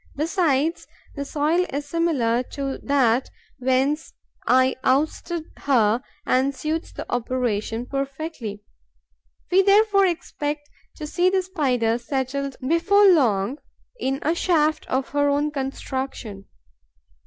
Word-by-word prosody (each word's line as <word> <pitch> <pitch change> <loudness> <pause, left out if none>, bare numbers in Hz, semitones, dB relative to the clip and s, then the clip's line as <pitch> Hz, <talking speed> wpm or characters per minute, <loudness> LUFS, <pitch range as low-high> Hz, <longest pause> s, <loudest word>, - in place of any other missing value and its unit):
Besides, 320 -1 0 0.3
the 280 - -3
soil 305 +5 +1
is 285 +1 -4
similar 280 -8 +1
to 275 -1 -3
that 260 -3 +2 0.3
whence 265 +4 0 0.3
I 260 +1 +4
ousted 310 +4 0
her 235 -4 +2 0.2
and 265 +2 +2
suits 315 +4 -3
the - - -7
operation 240 -2 -1
perfectly. 275 -6 -5 0.9
We 375 +2 +6
therefore 400 0 +4
expect 295 -4 -4 0.2
to 305 - -6
see 350 +4 +2
the 380 0 +1
Spider 250 -11 0
settled 270 +2 -3
before 395 +6 +5
long 250 - +2 0.4
in 270 -7 -1
a 320 - +2
shaft 315 -3 +1
of 260 +1 -1
her 285 0 +2
own 290 +1 +1
construction. 265 -6 -5
280 Hz, 115 wpm, -23 LUFS, 255-320 Hz, 0.9 s, We